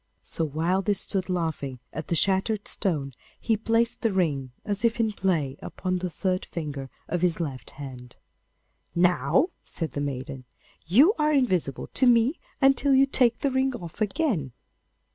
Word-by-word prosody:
So -, -, -2 dB
while 165 Hz, +5 st, 0 dB
they 205 Hz, +1 st, +1 dB
stood 190 Hz, -1 st, 0 dB
laughing 160 Hz, -7 st, -2 dB
at 155 Hz, -, -5 dB
the 170 Hz, -, 0 dB
shattered 195 Hz, +4 st, +1 dB
stone 150 Hz, -9 st, 0 dB, 0.3 s
he 225 Hz, -, +1 dB
placed 230 Hz, +2 st, 0 dB
the 225 Hz, -, +1 dB
ring, 145 Hz, -9 st, 0 dB
as 205 Hz, 0 st, -2 dB
if 235 Hz, 0 st, +2 dB
in 220 Hz, -2 st, +1 dB
play, 165 Hz, -9 st, 0 dB
upon 185 Hz, -1 st, -3 dB
the 180 Hz, 0 st, -3 dB
third 185 Hz, +2 st, -1 dB
finger 145 Hz, -5 st, -5 dB, 0.2 s
of 175 Hz, 0 st, -2 dB
his 180 Hz, -2 st, +2 dB
left 135 Hz, -8 st, -4 dB
hand. 125 Hz, -3 st, -9 dB, 0.8 s
'Now,' 175 Hz, -, +3 dB
said 160 Hz, -5 st, -4 dB
the 145 Hz, -, -3 dB
maiden, 135 Hz, -1 st, -5 dB, 0.4 s
'you 270 Hz, -, +6 dB
are 300 Hz, 0 st, +3 dB
invisible 185 Hz, -, +1 dB
to 260 Hz, -, +3 dB
me 240 Hz, +5 st, +4 dB, 0.2 s
until 275 Hz, 0 st, +4 dB
you 270 Hz, +1 st, +6 dB
take 250 Hz, -4 st, +2 dB
the 280 Hz, -, +1 dB
ring 265 Hz, 0 st, +1 dB
off 175 Hz, -1 st, -9 dB
again. 210 Hz, -, 0 dB
185 Hz, 160 wpm, -26 LUFS, 150-230 Hz, 0.8 s, you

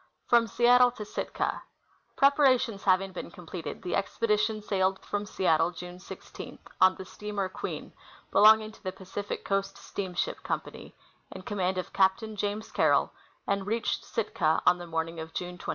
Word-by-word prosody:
Fkom 235 Hz, -2 st, +5 dB
Seattle 245 Hz, +3 st, +5 dB
to 230 Hz, -3 st, -8 dB
Sitka. -, -, -3 dB, 0.5 s
Preparations 265 Hz, -7 st, +3 dB
having 190 Hz, 0 st, +3 dB
been 180 Hz, -, -7 dB
completed, 175 Hz, 0 st, -7 dB
the 180 Hz, -, -1 dB
expedition 215 Hz, +1 st, 0 dB
sailed 190 Hz, -2 st, +1 dB
from 205 Hz, 0 st, -3 dB
Seattle 165 Hz, -4 st, +2 dB
June 180 Hz, +1 st, -9 dB
16, 185 Hz, -, -10 dB, 0.2 s
on 185 Hz, 0 st, +6 dB
the 190 Hz, -, -8 dB
steamer 205 Hz, 0 st, -4 dB
Queen, 185 Hz, -, -6 dB, 0.4 s
belonging 215 Hz, +1 st, +6 dB
to -, -, -18 dB
the 185 Hz, -, -3 dB
Pacific 190 Hz, +2 st, -6 dB
Coast 195 Hz, 0 st, -1 dB
Steamship 185 Hz, -2 st, -3 dB
Company, -, -, -5 dB, 0.3 s
in 190 Hz, -, -9 dB
command 190 Hz, -2 st, -1 dB
of 185 Hz, 0 st, -4 dB
Captain 195 Hz, +3 st, +2 dB
James 205 Hz, +1 st, -3 dB
Carroll, -, -, +3 dB, 0.3 s
and 200 Hz, 0 st, -1 dB
reached 225 Hz, +1 st, -1 dB
Sitka 165 Hz, -8 st, 0 dB
on 180 Hz, 0 st, +5 dB
the 175 Hz, -, -8 dB
morning 165 Hz, 0 st, -3 dB
of 160 Hz, 0 st, -8 dB
June 180 Hz, 0 st, -5 dB
24. -, -, -7 dB
195 Hz, 155 wpm, -29 LUFS, 180-215 Hz, 0.5 s, on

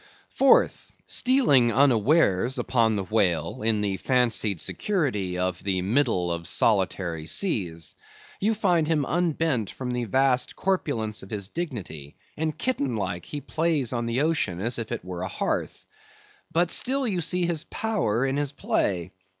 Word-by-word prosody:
Fourth: 270 Hz, 0 st, +3 dB
Stealing 235 Hz, -, +3 dB
unawares 130 Hz, -, +3 dB
upon 115 Hz, -3 st, +2 dB
the 100 Hz, -, -1 dB
whale 90 Hz, -6 st, 0 dB
in 110 Hz, -1 st, +1 dB
the 100 Hz, -2 st, -1 dB
fancied 115 Hz, -7 st, +1 dB
security 115 Hz, -, -1 dB
of 90 Hz, 0 st, -2 dB
the 95 Hz, -2 st, -1 dB
middle 105 Hz, -5 st, +1 dB
of 85 Hz, -1 st, -4 dB
solitary 90 Hz, -5 st, +1 dB
seas, 90 Hz, -, -2 dB, 0.5 s
you 220 Hz, +3 st, +1 dB
find 180 Hz, -7 st, +2 dB
him 155 Hz, -3 st, +1 dB
unbent 160 Hz, -, 0 dB
from 125 Hz, -2 st, -5 dB
the 125 Hz, -1 st, -2 dB
vast 130 Hz, +3 st, +1 dB
corpulence 130 Hz, -, -1 dB
of 95 Hz, -, -12 dB
his 100 Hz, -3 st, -3 dB
dignity, 100 Hz, -, -6 dB, 0.2 s
and 155 Hz, 0 st, -2 dB
kitten 140 Hz, -, -1 dB
like, 90 Hz, -4 st, -3 dB
he 145 Hz, -, -6 dB
plays 155 Hz, -7 st, 0 dB
on 120 Hz, -1 st, -2 dB
the 120 Hz, +3 st, 0 dB
ocean 145 Hz, -, 0 dB
as 120 Hz, +5 st, 0 dB
if 115 Hz, -, -5 dB
it -, -, -4 dB
were 90 Hz, -1 st, -6 dB
a 95 Hz, -, -2 dB
hearth. -, -, -3 dB, 0.7 s
But 170 Hz, +1 st, +2 dB
still 270 Hz, 0 st, +1 dB
you 185 Hz, -5 st, 0 dB
see 180 Hz, +2 st, 0 dB
his 170 Hz, -2 st, -2 dB
power 155 Hz, -, -1 dB
in 135 Hz, +1 st, -1 dB
his 145 Hz, -1 st, 0 dB
play. 90 Hz, -, -1 dB
120 Hz, 155 wpm, -25 LUFS, 95-160 Hz, 0.7 s, Fourth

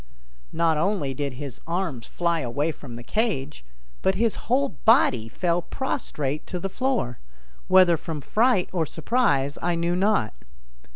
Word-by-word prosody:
Not 165 Hz, -1 st, +2 dB
only 165 Hz, -6 st, 0 dB
did 140 Hz, 0 st, -3 dB
his 135 Hz, -1 st, -7 dB
arms 170 Hz, -9 st, -2 dB
fly 170 Hz, -1 st, 0 dB
away 145 Hz, +4 st, -1 dB
from 130 Hz, -6 st, -10 dB
the 120 Hz, -, -8 dB
cage, 155 Hz, -, -2 dB, 0.4 s
but 190 Hz, 0 st, +2 dB
his 225 Hz, +2 st, +2 dB, 0.2 s
whole 270 Hz, +3 st, +3 dB
body 130 Hz, -, +3 dB
fell 175 Hz, +6 st, 0 dB
prostrate 150 Hz, -, -3 dB
to 180 Hz, -, -4 dB
the 195 Hz, -, -3 dB
floor, 245 Hz, -, -1 dB, 0.5 s
whether 185 Hz, -3 st, +6 dB
from 155 Hz, -1 st, -5 dB
fright 215 Hz, -, +2 dB
or 165 Hz, -4 st, 0 dB
surprise, 150 Hz, -, +1 dB
I 175 Hz, 0 st, +1 dB
knew 170 Hz, +1 st, 0 dB
not. 190 Hz, -, +2 dB
170 Hz, 150 wpm, -25 LUFS, 140-200 Hz, 0.5 s, whether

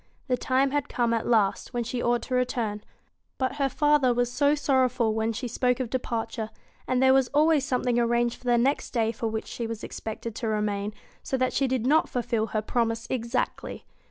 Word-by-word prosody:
The 255 Hz, -, +2 dB
time 265 Hz, +2 st, +1 dB
had 290 Hz, -1 st, -1 dB
come 235 Hz, -1 st, +1 dB
at 230 Hz, -, -1 dB
last 220 Hz, +1 st, +1 dB
when 240 Hz, -, 0 dB
she 240 Hz, +1 st, -3 dB
ought 240 Hz, 0 st, +1 dB
to 255 Hz, -, -5 dB
return; 240 Hz, -4 st, 0 dB, 0.6 s
but 260 Hz, +1 st, -1 dB
her 275 Hz, -2 st, +1 dB
father 295 Hz, -4 st, +3 dB
was 245 Hz, 0 st, +1 dB
so 285 Hz, +3 st, +3 dB
sorrowful 255 Hz, -5 st, +2 dB
when 220 Hz, +1 st, 0 dB
she 245 Hz, +3 st, -4 dB
spoke 250 Hz, +1 st, 0 dB
of 245 Hz, -4 st, -3 dB
departure, 225 Hz, -3 st, -3 dB, 0.4 s
and 255 Hz, 0 st, +2 dB
there 265 Hz, 0 st, +6 dB
was 265 Hz, -1 st, +4 dB
always 305 Hz, -2 st, +4 dB
some 255 Hz, -2 st, -1 dB
thing 245 Hz, -1 st, +2 dB
arranged 235 Hz, 0 st, +1 dB
for -, -, -20 dB
the 240 Hz, -1 st, +3 dB
next 265 Hz, +4 st, 0 dB
day 225 Hz, -2 st, +1 dB
for 230 Hz, 0 st, -3 dB
which 220 Hz, 0 st, -3 dB
she 235 Hz, -, -5 dB
was 225 Hz, -1 st, -6 dB
expected 225 Hz, +1 st, -6 dB
to 230 Hz, -, -3 dB
remain, 210 Hz, -1 st, -1 dB, 0.3 s
so 265 Hz, -, -2 dB
that 255 Hz, 0 st, 0 dB
she 275 Hz, -, +2 dB
did 255 Hz, -2 st, -1 dB
not 305 Hz, +4 st, +3 dB
fulfil 235 Hz, -3 st, -1 dB
her 215 Hz, -1 st, -2 dB
promise 230 Hz, 0 st, -1 dB
exactly. 240 Hz, 0 st, -2 dB
245 Hz, 210 wpm, -26 LUFS, 230-260 Hz, 0.6 s, there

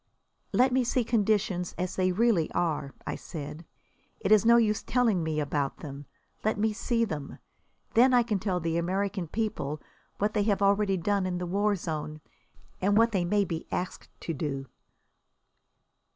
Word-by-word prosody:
"Let 255 Hz, +1 st, +4 dB
me 260 Hz, 0 st, +3 dB
see 245 Hz, +1 st, +1 dB
conditions 205 Hz, -5 st, 0 dB
as 180 Hz, 0 st, -3 dB
they 185 Hz, -1 st, +2 dB
really 200 Hz, -4 st, +2 dB
are," 150 Hz, -5 st, -1 dB
I -, -, -2 dB
said. 155 Hz, +1 st, -7 dB, 0.5 s
"It 195 Hz, -, -1 dB
is 215 Hz, -2 st, +7 dB
no 235 Hz, 0 st, +7 dB
use 215 Hz, -3 st, +2 dB
telling 235 Hz, -8 st, +2 dB
me 155 Hz, -1 st, -1 dB
about 145 Hz, -1 st, -1 dB
them. 145 Hz, -2 st, -8 dB, 0.4 s
Let 215 Hz, 0 st, +1 dB
me 215 Hz, +1 st, +1 dB
see 230 Hz, +1 st, 0 dB
them. 150 Hz, -9 st, -6 dB, 0.6 s
Then 250 Hz, +3 st, +6 dB
I 245 Hz, -1 st, +5 dB
can 215 Hz, -4 st, -1 dB
tell 185 Hz, -2 st, -1 dB
the 165 Hz, 0 st, -1 dB
American 190 Hz, +1 st, -1 dB
people 155 Hz, -7 st, -2 dB, 0.4 s
what 210 Hz, +1 st, 0 dB
they 210 Hz, -, +2 dB
have 200 Hz, -1 st, +1 dB
already 200 Hz, -1 st, +3 dB
done 195 Hz, +2 st, 0 dB
in 180 Hz, -1 st, -2 dB
the 180 Hz, -, -3 dB
war 205 Hz, +3 st, +1 dB
zone, 155 Hz, -3 st, -4 dB, 0.6 s
and 200 Hz, +2 st, +3 dB
what 230 Hz, +1 st, +5 dB
they 190 Hz, -4 st, +1 dB
may 205 Hz, +3 st, +2 dB
be 165 Hz, -2 st, -5 dB
asked 180 Hz, -, -4 dB
to 165 Hz, -, -3 dB
do." 135 Hz, -2 st, -3 dB
195 Hz, 170 wpm, -28 LUFS, 165-215 Hz, 0.6 s, is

